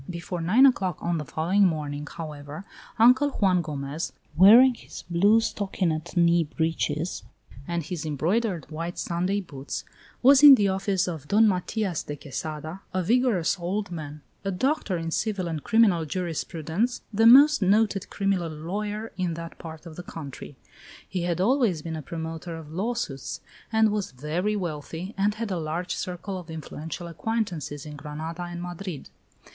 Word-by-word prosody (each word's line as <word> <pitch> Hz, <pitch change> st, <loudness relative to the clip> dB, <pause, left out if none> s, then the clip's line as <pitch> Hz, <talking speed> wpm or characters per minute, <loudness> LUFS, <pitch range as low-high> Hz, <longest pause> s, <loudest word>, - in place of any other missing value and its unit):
Before 175 Hz, 0 st, -5 dB
nine 215 Hz, +11 st, +5 dB
o'clock 190 Hz, -, +2 dB
on 170 Hz, -1 st, -1 dB
the 150 Hz, -, -5 dB
following 175 Hz, +8 st, +1 dB
morning, 150 Hz, -4 st, -1 dB
however, 150 Hz, +1 st, -8 dB, 0.3 s
Uncle 250 Hz, +5 st, +6 dB
Juan 190 Hz, -8 st, +2 dB
Gomez, 150 Hz, 0 st, -4 dB, 0.2 s
wearing 230 Hz, +9 st, +8 dB
his -, -, -11 dB
blue 200 Hz, +6 st, +5 dB
stockinet 180 Hz, -6 st, -2 dB
knee 170 Hz, 0 st, +4 dB
breeches 160 Hz, +1 st, -2 dB, 0.5 s
and 170 Hz, -1 st, -2 dB
his 175 Hz, 0 st, -5 dB
embroidered 170 Hz, -, -1 dB
white 165 Hz, +3 st, -5 dB
Sunday 180 Hz, +4 st, -1 dB
boots, 140 Hz, -6 st, -6 dB, 0.4 s
was 270 Hz, +1 st, +7 dB
in 290 Hz, -2 st, +11 dB
the 205 Hz, -5 st, +2 dB
office 190 Hz, 0 st, 0 dB
of 160 Hz, -5 st, -5 dB
Don 220 Hz, +5 st, +5 dB
Matias 190 Hz, -1 st, -1 dB
de 145 Hz, -, -6 dB
Quesada, 155 Hz, +4 st, -6 dB
a 185 Hz, -, +1 dB
vigorous 215 Hz, -5 st, +2 dB
old 185 Hz, +3 st, -2 dB
man, 150 Hz, -3 st, -7 dB, 0.2 s
a 195 Hz, -, -1 dB
doctor 200 Hz, -, 0 dB
in 165 Hz, 0 st, -4 dB
civil 200 Hz, -1 st, -1 dB
and 160 Hz, -3 st, -4 dB
criminal 200 Hz, -8 st, +3 dB
jurisprudence, 170 Hz, -, -2 dB
the 225 Hz, +2 st, +5 dB
most 285 Hz, +3 st, +8 dB
noted 200 Hz, 0 st, +2 dB
criminal 195 Hz, -4 st, 0 dB
lawyer 205 Hz, +8 st, -4 dB
in 175 Hz, -3 st, -1 dB
that 165 Hz, 0 st, -8 dB
part 160 Hz, 0 st, -9 dB
of 160 Hz, -2 st, -10 dB
the -, -, -5 dB
country. 145 Hz, -5 st, -9 dB, 0.5 s
He 185 Hz, -, -3 dB
had 175 Hz, -1 st, -1 dB
always 210 Hz, -, +2 dB
been 165 Hz, -1 st, -4 dB
a 155 Hz, -, -5 dB
promoter 165 Hz, +2 st, -6 dB
of 155 Hz, -2 st, -10 dB
lawsuits, 190 Hz, -, -3 dB, 0.3 s
and 220 Hz, -1 st, +4 dB
was 205 Hz, -8 st, -2 dB
very 165 Hz, +10 st, -1 dB
wealthy, 170 Hz, +1 st, -5 dB
and 205 Hz, +2 st, +1 dB
had 225 Hz, -2 st, -4 dB
a 180 Hz, -, -1 dB
large 165 Hz, +3 st, -3 dB
circle 185 Hz, +1 st, -5 dB
of 175 Hz, -, -12 dB
influential 160 Hz, +1 st, -6 dB
acquaintances 170 Hz, -, -3 dB
in 150 Hz, -1 st, -8 dB
Granada 155 Hz, +4 st, -6 dB
and 175 Hz, 0 st, -5 dB
Madrid. 175 Hz, -3 st, -6 dB
175 Hz, 160 wpm, -26 LUFS, 160-205 Hz, 0.5 s, in